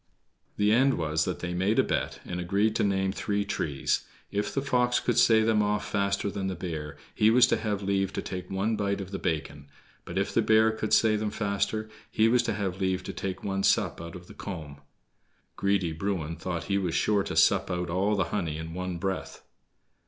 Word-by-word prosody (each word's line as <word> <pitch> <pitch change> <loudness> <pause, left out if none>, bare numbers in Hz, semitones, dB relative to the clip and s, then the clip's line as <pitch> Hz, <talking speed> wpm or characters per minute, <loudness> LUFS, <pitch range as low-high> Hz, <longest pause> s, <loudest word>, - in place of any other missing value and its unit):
The 105 +1 +3
end 130 +4 +4
was 80 -1 0
that 90 - -3
they 90 0 -3
made 95 +5 +1
a - - +5
bet, - - -2
and 90 - -4
agreed 100 +5 +1
to - - +1
name 95 -1 +1
three 100 0 -1
trees. 75 -8 -1 0.3
If 105 +1 -1
the 135 - -1
fox 125 -2 +2
could 120 -1 +1
say 110 -1 +5
them 110 -1 +3
off 105 0 0
faster 100 0 0
than 95 -1 -3
the 95 - -2
bear, 80 -5 -5 0.2
he 105 - +4
was 125 +2 +7
to - - +1
have 105 -2 -2
leave 95 -1 0
to - - -2
take 90 -1 -6
one 100 +4 0
bite 100 -1 -1
of 95 -1 -6
the 95 - -4
bacon; 70 -3 -3 0.3
but 85 - -6
if 100 - 0
the - - +3
bear 110 0 +4
could 110 -1 -4
say 110 -1 +5
them 105 0 -1
faster, 105 +1 -1 0.2
he 110 +1 +3
was 120 +1 +4
to 120 - -1
have 95 -2 -3
leave 95 -1 0
to - - -6
take 95 -1 -4
one 95 -1 -1
sup 95 - +2
out 85 +3 -8
of 90 -1 -10
the - - -13
comb. 75 -7 -7 0.7
Greedy 100 -4 +1
Bruin 85 -2 -2
thought 85 -1 -4
he 100 0 0
was 90 -4 -2
sure 105 +3 +2
to - - -4
sup - - +4
out 90 -1 -2
all 100 +4 +1
the 95 - +2
honey 80 -7 -1
at 80 0 -6
one 90 0 -4
breath. 95 +2 -4
100 Hz, 220 wpm, -28 LUFS, 90-105 Hz, 0.7 s, was